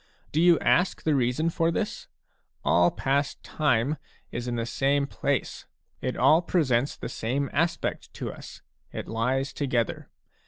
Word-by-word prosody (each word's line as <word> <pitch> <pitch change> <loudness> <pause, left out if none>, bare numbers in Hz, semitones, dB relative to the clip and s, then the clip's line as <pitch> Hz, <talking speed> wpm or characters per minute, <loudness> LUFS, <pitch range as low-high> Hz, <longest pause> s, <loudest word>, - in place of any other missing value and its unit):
Do 155 - +2
you 175 -1 +6
ask 180 +2 +2
the 155 - +2
reason 135 +5 +1
for 165 0 +1
this? 210 +5 -3 0.6
All 85 0 +5
past 140 +1 -1
time 145 -1 +1 0.3
is 120 0 -4
in 120 - -1
the 115 -1 -1
same 140 +4 +1
place; - - -2 0.3
it - - -2
all 160 +2 +5
presents 140 -7 +1
the - - -5
same 135 +5 -2
aspect 165 +4 -1
to - - -4
us, - - -11 0.3
it - - -6
lies 130 +5 -1
together. 125 -5 -1
140 Hz, 150 wpm, -27 LUFS, 120-160 Hz, 0.6 s, you